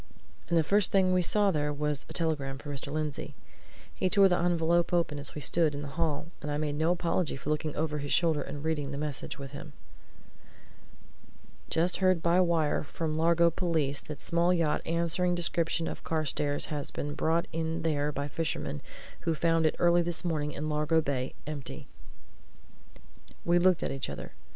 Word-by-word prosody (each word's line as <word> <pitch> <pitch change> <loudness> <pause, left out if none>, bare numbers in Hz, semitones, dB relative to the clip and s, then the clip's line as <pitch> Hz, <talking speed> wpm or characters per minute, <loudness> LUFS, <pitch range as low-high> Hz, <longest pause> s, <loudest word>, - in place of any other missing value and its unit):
And 170 - +3
the 160 - +4
first 200 +5 +3
thing 185 -2 +3
we 180 - +3
saw 205 +3 +4
there 150 -3 0
was 150 -1 -2
a - - -7
telegram 145 -5 -1
for 145 +1 -7
Mr. 140 0 -5
Lindsey. 155 -2 -3 0.6
He 185 - 0
tore 200 0 +6
the 180 -2 +2
envelope 170 0 +2
open 170 -4 +1
as 140 - -5
we 150 - -5
stood 160 -1 +3
in 145 - -5
the 145 - -6
hall, 155 -1 -1 0.2
and 150 - -5
I 145 - -1
made 150 -1 -1
no 160 +3 +1
apology 175 -2 -1
for 140 +2 -4
looking 155 0 -2
over 150 -1 -1
his 145 0 -4
shoulder 160 -3 +3
and 145 0 -6
reading 155 -3 -1
the 140 - -4
message 145 -2 -4
with 135 -2 -8
him. 145 +1 -9 2.0
"Just 170 +3 +1
heard 185 -3 +2
by 170 +2 +4
wire 165 -4 +2
from 155 +1 -3
Largo 170 +1 +4
police 160 -6 0
that 150 -2 -8
small 170 +1 +1
yacht 165 -4 +1
answering 170 +2 +1
description 165 -1 0
of - - -6
Carstairs' 150 -3 -1
has 145 -1 -3
been 145 0 -4
brought 165 +3 +1
in 165 0 -2
there 150 -2 0
by 140 0 -3
fishermen 145 - -3 0.4
who 165 - -1
found 165 0 +2
it - - -1
early 175 0 +4
this 175 +1 0
morning 150 -3 -1
in 150 +1 -4
Largo 150 +1 +2
Bay, 135 -4 -2
empty." 145 -3 -6 1.6
We 175 +1 +4
looked 180 -1 +3
at - - +3
each 135 -1 -4
other. - - -7
160 Hz, 185 wpm, -29 LUFS, 145-170 Hz, 2.0 s, tore